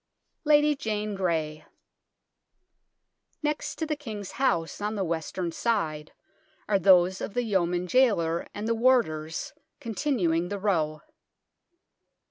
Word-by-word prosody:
LADY 295 0 +5
JANE 215 -5 -3
GREY 160 -5 -1 1.8
Next 300 0 -2
to 320 - -2
the 305 -1 -1
King's 215 -9 -7
House, 170 -9 0
on 210 +1 -2
the 200 - -1
western 170 +1 -3
side, 160 -9 -1 0.6
are 200 -2 +2
those 185 0 +5
of 205 - -5
the 245 - +1
Yeoman 180 -5 0
Jailer 180 -7 +2
and 210 +2 -5
the 230 - +2
warders, 225 -11 +1 0.3
continuing 210 - 0
the 205 - -3
row. 160 -7 0
195 Hz, 115 wpm, -27 LUFS, 170-230 Hz, 1.8 s, LADY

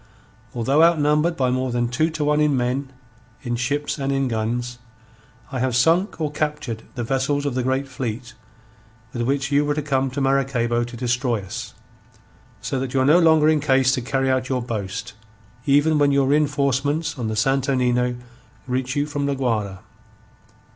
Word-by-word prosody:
"Although 135 +6 +2
outnumbered 165 0 +3
by 130 -2 +1
more 130 0 -1
than 120 0 0
two 155 +7 0
to 155 -2 -3
one 150 +1 +2
in 150 -3 +2
men, 130 +2 -1 0.5
in 120 -2 -2
ships, 145 +5 -2
and 135 0 -1
in 135 -1 0
guns, 120 +2 -2 0.7
I 130 - -3
have 130 -1 0
sunk 165 - +2
or 155 -2 -1
captured 150 -7 -3
the 120 - -3
vessels 135 +4 0
of 140 - -1
the 130 - -1
great 130 +2 -1
fleet 125 -2 -5 0.8
with 120 - -3
which 140 +3 -1
you 145 +1 +3
were 145 0 0
to 150 - -1
come 135 -2 0
to 130 +3 -5
Maracaybo 130 -3 +1
to 120 0 -9
destroy 120 -2 -1
us. 95 - -7 0.9
So 135 - -2
that 130 0 -4
you 130 - +3
are - - +2
no 155 +5 +6
longer 160 -2 +5
in 155 -1 +4
case 135 -2 +3
to 130 - 0
carry 135 +1 0
out 130 -1 -1
your 130 -2 -1
boast, 105 -4 -5 0.5
even 145 +2 +4
when 145 -1 +4
your 140 -1 +3
reenforcements 145 +1 0
on 115 - -2
the 110 - -2
Santo 135 +4 +1
Nino, 125 -1 +1 0.5
reach 130 0 -2
you 145 0 +1
from 145 -1 -3
La 140 - 0
Guayra. 105 -8 -2
135 Hz, 180 wpm, -22 LUFS, 125-145 Hz, 0.9 s, no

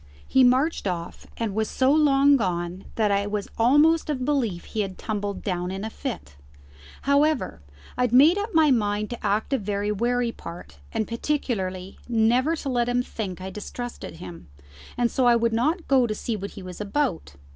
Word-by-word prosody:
He 265 - +4
marched 255 +1 +2
off, 170 -2 -5
and 225 -3 -2
was 220 +1 -1
so 260 +1 +2
long 285 -2 +5
gone 180 -5 -2
that 215 -2 +2
I 200 0 +1
was 205 -1 -3
almost 295 +8 +4
of 260 -4 -1
belief 240 -12 0
he 220 - -3
had 190 -2 -4
tumbled 205 -2 -4
down 180 -2 -2
in 195 +3 -4
a 220 - -5
fit. 215 - -6 0.7
However, 280 - +1 0.3
I - - -2
had 250 -2 +2
made 285 +8 +7
up 420 +2 -3
my 315 -5 +4
mind 210 -2 0
to 240 - -7
act 210 +5 0
a 270 - +2
very 205 0 -2
wary 240 +3 0
part; 170 - -10
and 215 - -1
particularly 205 -8 -3
never 240 +7 +3
to 285 - -5
let 240 -2 +1
him 245 0 +1
think 190 -7 -6
I 190 +1 -6
distrusted 240 +4 -7
him, 85 -2 -10 0.5
and 240 -1 +1
so 255 -2 +2
I 240 - +6
would 230 -1 +1
not 310 +10 0
go 260 -3 +4
to 215 - -2
see 230 +1 -3
what 200 -1 -5
he 195 - -7
was 185 +1 -8
about. 200 - -2
230 Hz, 190 wpm, -25 LUFS, 200-265 Hz, 0.7 s, made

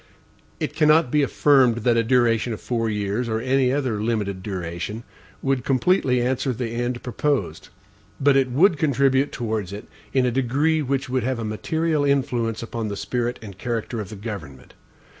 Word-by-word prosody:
It - - -3
cannot 155 -2 +4
be 150 - +3
affirmed, 130 -5 +3
that 120 -1 +3
a 115 - +4
duration 115 -1 +2
of 110 - -6
four 115 -2 -1
years, 105 +3 -2
or 110 0 0
any 130 +1 +2
other 130 -7 -1
limited 105 -4 -1
duration, 95 +3 -5 0.4
would 135 -2 0
completely 130 -2 +2
answer 130 +1 0
the 120 0 -3
end 120 +1 -3
proposed; 130 - -2 0.5
but 140 -1 +4
it 135 -1 +3
would 155 +5 +3
contribute 140 -1 +2
towards 110 -5 -3
it 100 +1 -7 0.3
in 130 -2 +2
a 125 - +1
degree 140 +6 +1
which 135 -1 -1
would 130 0 0
have 130 +2 -1
a 115 - -4
material 155 +8 -1
influence 125 -5 0
upon 115 -1 -4
the 100 -1 -4
spirit 120 +2 -2
and 100 -3 -10
character 115 -1 -3
of 100 - -7
the 110 - -8
government. 95 - -8
120 Hz, 175 wpm, -23 LUFS, 110-135 Hz, 0.5 s, cannot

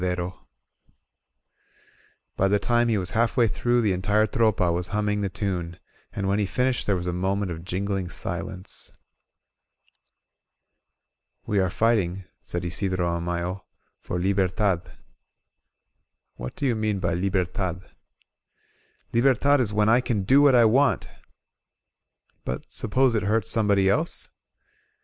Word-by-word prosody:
99 90 0 0
INSURGENT 90 +1 -4
MEXICO - - -32 1.9
By 95 - +2
the 105 +1 +3
time 120 +2 +1
he 115 -2 +2
was 95 -1 -2
half 115 0 +1
way 120 -2 +5
through, 120 +2 +1
the 105 -3 +2
entire 105 +4 +2
Tropa 105 -5 +1
was 90 +1 -2
humming 105 +1 -1
the 100 - -1
tune, 90 -4 -3 0.3
and 100 - -3
when 100 +2 +1
he 100 - 0
finished 125 +3 0
there 100 - +2
was 90 -1 -4
a 90 - -2
moment 95 +1 -1
of 80 0 -6
jingling 95 0 -2
silence. 90 +4 -6 2.5
We 105 - 0
are 95 -1 +2
fighting," 95 -3 +1 0.2
said 90 0 -5
Isidro 95 0 -1
Amayo, 85 +2 -3 0.4
"for 90 - -4
Liber 95 +1 +1
tad." 95 -2 -1 1.4
"What 60 0 -7
do 145 - -3
you 125 -4 +2
mean 110 -2 -1
by 90 -3 -1
Libertad?" 90 0 -2 1.3
"Libertad 135 +4 +3
is 115 -5 0
when 105 0 +2
I 115 +3 +5
can 110 -6 -1
do 135 +9 +5
what 140 -3 +6
I 120 - +6
wantT* 125 +2 +3 1.4
"But - - -5
suppose 130 +3 +1
it 110 - +1
hurts 105 +1 0
somebody 100 -4 +3
else?" 155 - 0
100 Hz, 140 wpm, -25 LUFS, 90-115 Hz, 2.5 s, what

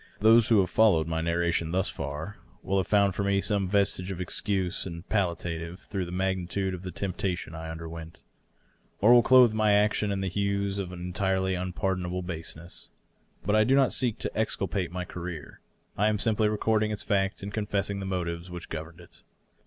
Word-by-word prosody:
Those 110 +1 +6
who 110 -3 +6
have 90 - -1
followed 105 -8 +4
my 80 0 -2
narration 85 0 0
thus 95 0 +1
far 75 +8 -5
either - - -28
will 95 - 0
have 95 - 0
found 100 -2 +3
for 100 - -2
me 100 0 +2
some 100 -2 +1
vestige 100 -2 +1
of 95 -2 -5
excuse 95 0 -1
and 85 +1 -8
pal 95 -5 +1
liative 85 0 -5
through 95 -2 -4
the 85 - -8
magnitude 95 0 -1
of 90 - -6
the 95 - -6
temptation 90 -2 -3
I 80 0 -6
underwent, 80 0 -8 0.8
or 110 +4 +6
will 120 - +8
clothe 125 -2 +6
my 110 -1 +3
action 105 0 +2
in 95 -1 -2
hues 100 +1 -1
of 95 -2 -4
an 90 - -8
entirely 95 +1 0
unpardonable 90 0 -2
baseness. 85 0 -6 0.6
But 105 +3 +2
I 110 - +5
do 130 +5 +3
not 135 -2 +4
seek 120 -4 0
to - - -5
exculpate 100 -4 -1
my 90 0 -4
career; 90 -4 -7 0.3
I 105 - +2
am 105 -1 +2
simply 105 +1 +2
recording 110 0 +1
its 105 -1 -3
fact 100 -2 0
and 100 +1 -6
confessing, 100 -2 -1
the 95 - -4
motives 85 -2 -3
which 90 -1 -8
governed 80 +2 -7
it. 85 - -14
95 Hz, 190 wpm, -28 LUFS, 85-105 Hz, 0.8 s, will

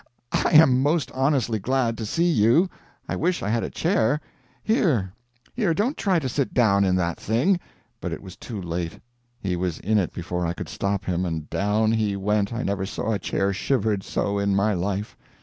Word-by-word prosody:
I - - +1
am 135 -5 +7
most 150 +2 +1
honestly 130 -4 +1
glad 120 +2 0
to 110 - -3
see 170 +9 +1
you. 155 - +4 0.4
I - - -2
wish 180 +2 0
I 100 - -1
had 115 +1 +1
a - - -3
chair 150 - +1 0.4
Here, 140 - +1 0.4
here, 200 -9 +1
don't 235 - 0
try 190 -4 +1
to 145 -5 -1
sit 135 +1 -2
down 100 -5 +4
in 95 -1 +2
that 85 -2 -1
thing 135 - +2 0.2
" - - -41
But - - -3
it - - -6
was 95 -2 -10
too 110 -4 -7
late. 85 -1 -4 0.4
He 95 -5 -2
was 90 -2 -2
in 110 +2 +2
it 90 - -1
before 90 0 -4
I 85 0 -1
could - - -7
stop 100 0 -2
him 90 0 0
and 80 -4 -3
down 105 +2 +1
he 110 -3 +1
went 100 +1 0
I 115 +1 -3
never 95 -1 -1
saw 110 - -3
a 105 - 0
chair 95 +2 0
shivered 110 -1 0
so 100 +1 -1
in 100 -1 +1
my 100 +2 +2
life. 100 +3 -2
105 Hz, 205 wpm, -24 LUFS, 95-135 Hz, 0.4 s, am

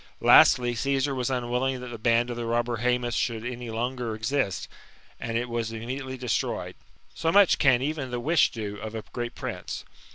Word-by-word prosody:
Lastly, 120 -1 +6
Caesar 135 +2 0
was 125 -2 -1
unwilling 125 +1 -1
thslt 125 -1 -8
the 120 - -6
band 115 +2 +2
of - - -4
the 120 -1 -4
robber 120 0 0
Hsemus 125 0 0
should 115 -1 -1
any 125 -1 -5
longer 120 0 -2
exist, 110 -2 -1 0.5
and 115 0 -2
It 120 +1 -2
was 115 -2 -2
itnmediately 130 +4 -5
destroyed. 125 -3 -2 0.4
So 165 - 0
much 200 -1 +5
can 130 -3 +4
even 145 -2 -2
the 125 0 -3
wish 155 +5 +3
do 105 -3 -5
of 110 +2 -7
a 110 - -4
great 120 0 -4
prince. - - -5
120 Hz, 185 wpm, -26 LUFS, 115-130 Hz, 0.5 s, Lastly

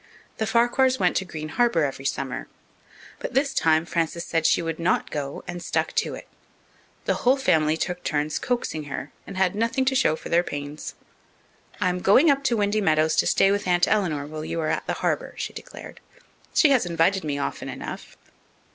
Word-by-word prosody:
The 220 - 0
Farquhars 245 +3 +3
went - - +2
to 190 - -1
Green 155 -3 -6
Harbour 230 -4 +2
every 135 -1 -5
summer. 135 -1 -3 0.7
But - - -6
this 275 +1 +2
time 160 0 +3
Frances 170 0 -2
said 165 -1 +1
she - - +2
would 165 0 -3
not 175 +2 0
go, 140 -2 -4
and 175 0 -5
stuck - - -1
to - - 0
it. - - -11 0.8
The - - +2
whole 255 +3 +4
family 160 - +2
took 180 +1 -3
turns 150 0 -1
coaxing 240 -11 -2
her 140 0 -6 0.2
and 195 - -7
had 190 -1 +2
nothing 230 +5 0
to 265 - +2
show 255 -11 +3
for - - -9
their 170 +1 +4
pains. 145 -2 -6 0.8
"I'm 180 -3 +1
going 260 - +5
up 275 0 0
to 235 -3 +2
Windy 210 +1 +1
Meadows 155 -3 +2
to - - +3
stay 195 - +4
with 200 -1 -1
Aunt 175 0 +3
Eleanor 170 -9 0
while 155 +1 -6
you 165 - -3
are 155 - -1
at - - -2
the - - 0
Harbour," - - -1
she - - -4
declared. - - -10 0.6
"She 300 - +5
has 250 -9 +3
invited 170 +3 +2
me 145 -2 -2
often 140 - -4
enough." - - -8
175 Hz, 195 wpm, -24 LUFS, 155-220 Hz, 0.8 s, going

